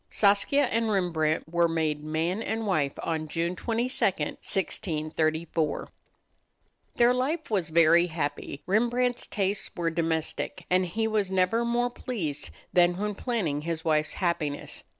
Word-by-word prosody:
Saskia 205 +8 +3
and 230 -3 0
Rembrandt 165 -7 0
were 170 +1 +2
made 155 -2 -1
man 165 +6 -1
and 225 0 -2
wife 155 -9 +1
on 160 -1 -2
June 170 +3 -1
22, 235 +5 -1
1634. 160 -2 -1 1.1
Their 240 +1 +5
life 285 +6 0
together 225 - -8
was 185 -6 +1
very 170 +2 +5
happy. 145 -3 -4
Rembrandt's 240 +4 +1
tastes 200 0 -1
were 170 -1 0
domestic, 165 -1 -2
and 185 0 +3
he 220 +6 -1
was 215 -3 0
never 190 +5 +2
more 240 +1 +1
pleased 160 - -4 0.2
than 175 0 +4
when 210 +1 -1
planning 195 - -1
his 165 +1 -4
wife's 155 -1 +1
happiness. 160 -5 -2
175 Hz, 135 wpm, -27 LUFS, 160-220 Hz, 1.1 s, Their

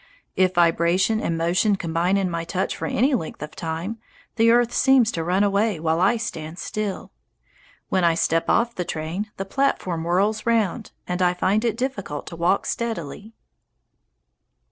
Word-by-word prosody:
If 185 -1 +2
vibration 175 +5 +2
and 165 - -1
motion 180 +5 +2
combine 175 +1 0
in 195 -1 +1
my 170 -1 -3
touch 185 +3 -2
for - - -4
any 265 +6 +2
length 160 -10 -3
of 150 - -9
time, 165 +7 -4 0.4
the 230 -1 +4
earth 240 0 +3
seems 260 -4 +4
to 165 - -3
run 180 +4 +1
away 200 -2 +1
while 160 +1 0
I 200 +6 +3
stand 165 -7 -6
still. 210 0 -4 0.8
When 185 -1 +1
I 170 -1 +4
step 165 0 +1
off 235 0 +2
the 180 - -3
train, 170 +6 -4
the 195 - -3
platform 195 -8 -1
whirls 195 +6 +1
round, 225 -1 0 0.2
and 180 +1 -2
I 180 0 +3
find 195 +5 +1
it 230 -2 0
difficult 205 - -4
to - - -5
walk 175 +4 +1
steadily. 220 -2 -4
185 Hz, 165 wpm, -23 LUFS, 170-220 Hz, 0.8 s, the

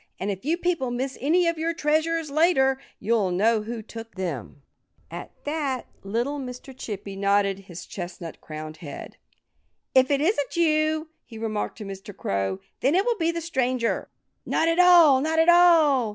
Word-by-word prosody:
And 200 +2 -1
if 190 -1 -6
you 320 +5 0
people 345 -7 -1
miss 255 +2 -3
any 340 +6 +3
of 335 -1 0
your 330 +1 -1
treasures, 315 0 0
later, 280 -4 +3 0.2
you'll 215 -3 +1
know 215 +5 +2
who 225 +1 -6
took 225 +1 -10
them." 150 - -5 0.5
At - - -7
that 290 -4 -2 0.2
little 240 +9 -2
Mr. 255 0 -8
Chippy 205 -5 -6
nodded 200 0 +1
his 180 -3 -10
chestnut 175 -4 -8
crowned 155 0 -8
head. 150 -3 -9 0.8
"If 260 0 +5
it 280 -1 +2
isn't 310 -2 0
you," 310 -1 +2
he 225 - -12
remarked 220 -1 -3
to 215 - -7
Mr. 195 0 -9
Crow, 95 -1 -2 0.2
"then 275 +6 +2
it 385 +3 +3
will 480 -2 +1
be 330 0 +2
the 335 0 -2
stranger." 255 -7 -1 0.3
"Not 320 - +1
at 330 +1 +2
all! 340 -7 +7
Not 320 +2 0
at 325 +1 +5
all!" 320 -9 +5
260 Hz, 170 wpm, -25 LUFS, 200-320 Hz, 0.8 s, all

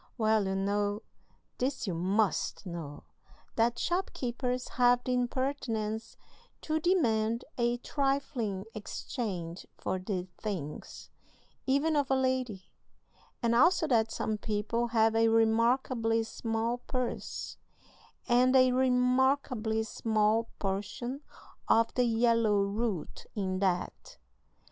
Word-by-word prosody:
Well, 220 -3 +2
you 190 - -1
know 205 +2 0 0.6
(this 265 +1 -1
you 190 - -2
must 195 +5 0
know) 165 -5 -7 0.5
that 235 +1 +2
shopkeepers 250 -8 -2
have 245 0 +3
the 255 - -1
impertinence 240 -4 -2 0.4
to 315 0 -1
demand 235 -10 +1
a 240 0 +1
trifling 250 -7 -1
exchange 195 -5 -5
for 185 - -2
these 185 -1 -3
things, 170 -9 -6 0.6
even 285 +4 +2
of 285 -2 +1
a 265 - +3
lady; 255 -7 -1 0.8
and 235 0 +3
also 330 +7 +4
that 225 -3 +3
some 215 -1 -2
people 220 +3 -1
have 225 -1 +3
a 225 0 +4
remarkably 225 +1 +2
small 225 +1 -2
purse, 250 0 -4 0.7
and 255 +2 +4
a 255 -1 +6
remarkably 250 -2 +2
small 220 0 +1
portion 210 +7 -3 0.5
of 230 0 +3
the 250 - +2
yellow 230 -3 +3
"root" 200 -3 -3
in 190 -3 -1
that. 185 -2 -2
230 Hz, 110 wpm, -30 LUFS, 210-255 Hz, 0.8 s, a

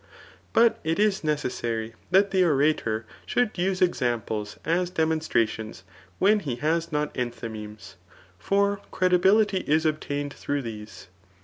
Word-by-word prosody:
But 230 0 +4
it 160 +1 0
is 205 -3 +2
necessary 120 -7 -2 0.2
that 195 +1 +4
the 190 -1 +3
orator 140 -8 +1 0.2
should 245 -3 +1
use 185 +1 +1
examines 115 - -1
as 175 +2 +1
demonstrations 155 - -1 0.3
when 210 +2 +4
he 140 -11 -3
has 165 +5 -1
not 150 0 -1
enthymemes; 110 -5 -6 0.4
for 200 0 +1
credibility 190 +3 +3
is 155 -1 +1
obtained 145 -2 -2
through 145 -1 -3
these. 105 -3 -8
155 Hz, 120 wpm, -26 LUFS, 115-185 Hz, 0.4 s, But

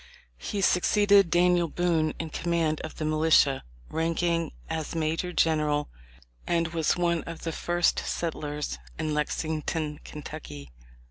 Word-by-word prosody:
He 200 - -3
succeeded 200 +1 +4
Daniel 175 0 +3
Boone 165 -2 0
in 160 -1 -5
command 165 -2 0
of 155 - -7
the 155 - -3
militia, 155 -3 +4 0.3
ranking 165 - 0 0.2
as 160 0 -4
major 165 +2 -1
general, 150 -3 +1 0.6
and 165 -1 +1
was 165 0 +1
one 170 -2 +1
of 165 -1 -8
the 165 - -2
first 175 +2 +1
settlers 150 -3 -3 0.2
in 155 -1 -2
Lexington, 155 0 -2
Ky. 140 - -8
160 Hz, 125 wpm, -27 LUFS, 155-170 Hz, 0.6 s, succeeded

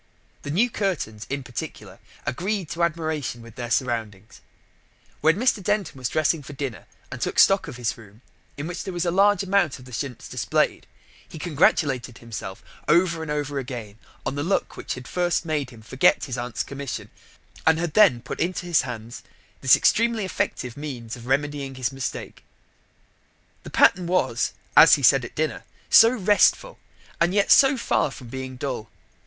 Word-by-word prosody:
The - - -7
new 195 +12 +3
curtains, 175 - -3
in 140 0 -3
particular, 120 -5 -8 0.3
agreed 185 +3 -2
to 170 - -4
admiration 155 -7 -2
with 115 -1 -13
their 120 +1 -6
surroundings. 115 -5 -2 0.8
When 160 +4 +3
Mr. 235 -2 +2
Denton 205 -4 -1
was 130 -3 -3
dressing 155 0 +1
for 145 +1 -10
dinner, 130 - -5 0.2
and - - -7
took - - -2
stock 195 0 +5
of 125 - -8
his 120 -3 -2
room, 110 +1 -17 0.3
in 145 - -4
which 175 +1 -5
there 190 - -6
was 175 +1 -1
a 170 - +1
large 200 +1 +4
amount 195 -6 +1
of 125 - -14
the 125 - -13
chintz 125 0 -5
displayed, - - -1 0.4
he - - -9
congratulated 140 -6 +1
himself 110 -4 -8 0.2
over 170 -1 +3
and 160 - -6
over 145 -1 -2
again 115 -5 -7 0.3
on - - -1
the 145 - -3
luck 185 +6 -1
which - - -5
had 125 0 -10
first 175 -2 0
made 150 -5 -1
him 115 -3 -14
forget 130 +4 +2
his 130 -4 -4
aunt's 120 -6 -3
commission 140 -2 -6 0.6
and 160 0 +5
had 165 -2 -2
then 180 - +5
put - - -6
into 180 +1 -1
his 170 -3 +3
hands 120 -2 -7 0.4
this 130 - +7
extremely 230 -2 +2
effective 125 -8 -3
means 125 -6 -6
of 120 0 -12
remedying 140 0 -1
his 130 0 -2
mistake. 135 -1 -6 1.2
The - - -10
pattern 180 -1 +4
was, 185 +1 0 0.2
as - - +9
he - - -5
said - - +5
at - - -9
dinner, - - -2 0.3
so 225 - +9
restful 220 - +2 0.4
and 175 +3 +2
yet 200 - +2
so 270 -1 +6
far 230 - +1
from 130 -3 -11
being 130 +1 -6
dull. 125 -4 -4
145 Hz, 175 wpm, -24 LUFS, 125-175 Hz, 1.2 s, as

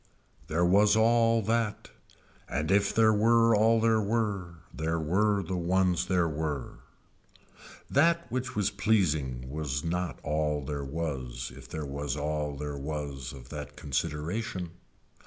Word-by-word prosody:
There 85 +3 +1
was 100 +4 +5
all 115 0 +4
that 110 0 -1 0.6
and 75 +4 -1
if 100 +1 +3
there 110 -1 +4
were 115 +2 +4
all 110 +2 +4
there 110 -1 +3
were 100 -5 -1 0.2
there 80 +1 -1
were 100 +6 +1
the 90 +2 -3
ones 90 0 +1
there 90 -2 +2
were. 75 -4 -4 1.1
That 170 +4 +3
which 130 0 -3
was 105 -2 +1
pleasing 80 - 0
was 70 0 -3
not 85 -4 -2
all 75 -1 -1
there 70 0 -3
was 65 -5 -4
if - - -13
there 80 -1 -4
was 70 0 -3
all 75 0 -2
there 70 0 -5
was 70 -3 -5
of 65 -3 -12
that 75 0 -7
consideration. 80 - -3
85 Hz, 140 wpm, -29 LUFS, 75-105 Hz, 1.1 s, was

